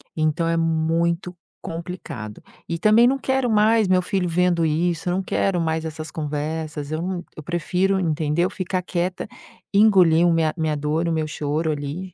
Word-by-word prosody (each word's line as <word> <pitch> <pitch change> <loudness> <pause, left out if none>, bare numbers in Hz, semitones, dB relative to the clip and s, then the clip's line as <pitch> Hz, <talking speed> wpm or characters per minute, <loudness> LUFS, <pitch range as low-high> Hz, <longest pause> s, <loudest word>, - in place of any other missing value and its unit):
Então 155 +1 0
é 165 - +1
muito 165 +2 0 0.3
complicado. 165 - -7 0.3
E 170 - -1
também 215 +5 +5
não 270 +2 +2
quero 265 -2 0
mais 215 0 +4
meu 185 0 +3
filho 180 0 -1
vendo 175 0 +2
isso, 165 +2 0
não 190 +2 0
quero 185 -2 0
mais 160 0 -1
essas 155 0 -6
conversas, 150 0 -4
eu 155 +1 -2
não 180 0 -3
eu - - -6
prefiro, 180 +4 0
entendeu, 160 +1 0
ficar 185 0 -3
quieta, 180 0 -2 0.5
engolir 185 -5 +5
o 170 - +3
minha 160 -2 +1
minha 155 -2 0
dor, 150 +3 -1
o - - 0
meu 155 -1 -1
choro 155 +1 -2
ali 150 +6 -5
170 Hz, 170 wpm, -22 LUFS, 155-185 Hz, 0.5 s, também